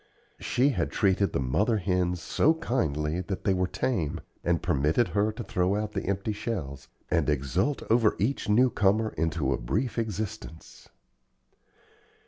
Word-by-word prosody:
She 130 +3 +2
had 140 - -1
treated 100 -1 +2
the - - -1
mother 95 - +1
hens 90 -3 0
so 160 +2 +2
kindly 80 - -1
that 95 - -4
they 95 - +2
were 90 0 +1
tame, 90 - -2 0.2
and 85 -1 +1
permitted 75 - +1
her 105 +1 +1
to 120 +2 -6
throw 95 -1 0
out 105 0 -2
the - - -4
empty 100 +2 -1
shells, 85 - -5 0.2
and 85 -3 +2
exult 75 - 0
over 115 -2 +3
each 115 +2 -1
new 125 +4 +4
comer 105 +2 +2
into 80 -4 0
a - - -3
brief 110 - -1
existence. 110 -6 -6
95 Hz, 150 wpm, -27 LUFS, 80-110 Hz, 0.2 s, new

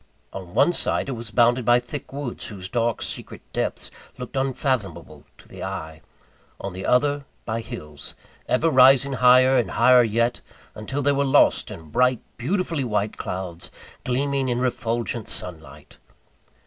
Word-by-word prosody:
On 95 -2 -9
one 175 - +4
side, 140 - -1
it - - -2
was 115 -2 -5
bounded 120 +2 +3
by 120 +2 +4
thick 125 +3 -8
woods, 140 -3 -5
whose 95 -3 -7
dark 115 +1 -1
secret - - -5
depths - - -3 0.3
looked 125 +1 -8
unfathomable 130 - -2
to - - -18
the - - -9
eye: 80 -5 -6 0.6
on 100 -1 -5
the 95 +1 -5
other, 145 +3 +2 0.2
by 115 0 -2
hills, 75 -8 -9 0.3
ever 160 +6 +2
rising 135 +1 +6
higher 130 +1 +5
and 120 - +1
higher 125 +1 +5
yet, 115 +1 0 0.3
until 135 +7 -4
they 145 - +3
were 140 0 +1
lost 140 +1 +3
in 80 -7 -10
bright, 125 -1 +2 0.2
beautifully 165 - -1
white 105 -3 -1
clouds, 90 -2 -5 0.3
gleaming 135 +1 0
in 120 - 0
refulgent 120 -2 -2
sunlight. 80 -4 -7
120 Hz, 150 wpm, -23 LUFS, 105-135 Hz, 0.6 s, rising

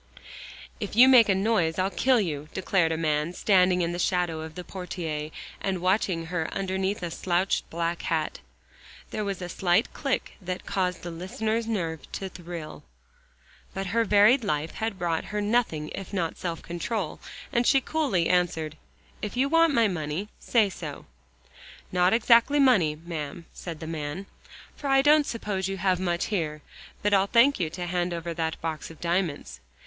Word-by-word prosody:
"If 205 -3 -5
you 250 +3 +9
make 245 -5 +7
a 195 - +4
noise 190 -5 +1
I'll 190 +1 +1
kill 255 +2 +3
you," 155 -6 -3
declared 185 -3 +2
a 160 - 0
man, 155 +1 0
standing 180 -2 +3
in 170 - -1
the 175 - -4
shadow 175 -3 0
of 160 +1 -8
a 180 - -5
portiere 165 -5 -5 0.3
and 190 -2 -1
watching 185 -2 +1
her 165 -1 -2
underneath 190 0 -2
a 170 - -3
slouched 180 +3 0
black 170 +1 -2
hat. 160 -2 -1 0.7
There 215 - -2
was 195 -2 -3
a - - -4
slight 180 +4 +1
click 275 -3 -2
that 185 0 -5
caused 180 -2 -1
the 175 - -5
listener's 220 +6 -2
nerves 165 -8 -3
to 195 - -4
thrill. 170 -3 -8 0.9
But 195 0 -2
her 230 0 +3
varied 215 +5 +5
life 155 -4 -1
had 220 -3 -3
brought 170 -3 -1
her 210 - -3
nothing 205 -8 0
if 195 - -7
not 175 -5 -1
self 170 -2 -4
control, 175 +1 -3 0.3
and 240 -1 +2
she 270 - +6
coolly 265 - 0
answered, 160 -3 0 0.4
"If 210 +3 -4
you 270 +2 +2
want 330 +1 +5
my 230 -5 +4
money, 175 +2 -3
say 215 -5 +2
so." 155 -6 -7 0.9
"Not 180 0 +3
exactly 235 +5 +5
money, 205 - +4
ma'am," 160 0 -6
said 165 -3 -7
the 160 - -6
man, 160 +3 -4 0.5
"for 285 - -5
I 270 0 +4
don't 295 0 +5
suppose 205 -5 -2
you 195 0 -3
have 185 -1 +1
much 175 -2 0
here. 155 -5 -2 0.4
But 205 0 +2
I'll 195 0 +4
thank 240 +5 +4
you 165 -4 0
to 175 +2 -5
hand 175 0 -1
over 170 0 -4
that 160 -1 -1
there - - -13
box 160 -2 -4
of 165 - -13
diamonds." 170 - -2
180 Hz, 175 wpm, -27 LUFS, 165-210 Hz, 0.9 s, you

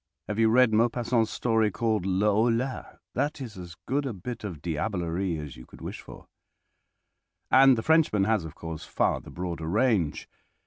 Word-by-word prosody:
Have 105 +1 -3
you 110 -1 +5
read 125 0 +4
Maupassant's 115 0 +2
story 110 -2 +1
called 110 -1 -1
"Le 95 +2 +1
Horla"? 120 +4 0 0.2
That 145 +4 -1
is 120 -5 -7
as 90 -3 -9
good 140 +2 -1
a 125 - -3
bit 110 +5 -7
of 90 -7 -5
diablerie 85 +1 -2
as 75 -4 -7
you 60 - -13
could - - -15
wish - - -6
for. - - -13 1.3
And 135 -1 +7
the 110 - -2
Frenchman 160 -11 +3
has, 110 -2 +1
of 80 - -9
course, 80 -1 -7
far - - 0
the - - -13
broader 85 -3 -5
range. 100 - +1
110 Hz, 175 wpm, -27 LUFS, 90-120 Hz, 1.3 s, And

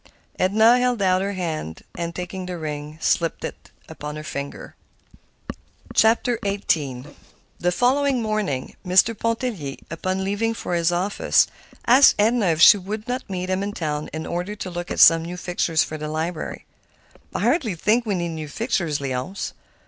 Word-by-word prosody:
Edna 220 +6 +5
held 250 -2 +1
out 185 0 +3
her 200 +1 -2
hand, 160 - -4
and 170 -1 -4
taking 180 +1 -5
the 180 -1 -4
ring, 150 -1 -6
slipped 165 0 0
it - - -8 0.2
upon 150 0 -7
her 155 - -6
finger. 140 -2 -6 1.2
XVIII 200 - +1 0.5
The 180 - +1
following 260 +5 +2
morning 215 - -2
Mr. 190 +5 +4
Pontellier, 225 - -2 0.2
upon 185 +3 -2
leaving 215 +4 -1
for 180 - -4
his 170 0 +2
office, 185 +4 +2 0.4
asked 260 +4 +7
Edna 220 0 +3
if 160 -1 +1
she 205 - +9
would 210 +3 -6
not 250 -1 -4
meet 185 -1 -3
him 185 +1 0
in 205 +1 -3
town 150 -4 -3
in 160 0 -5
order 180 +4 -3
to 190 -3 -6
look 175 0 -5
at - - -3
some 165 -1 +8
new 175 +2 -6
fixtures 175 -3 +1
for 155 - -6
the 150 - -4
library. 160 +2 -4 0.7
"I - - -1
hardly 240 - +1
think 215 +8 +2
we 210 -4 -1
need 175 -1 -2
new 160 -2 -5
fixtures, 175 - -1
Léonce. 135 +7 -4
185 Hz, 165 wpm, -23 LUFS, 160-215 Hz, 1.2 s, she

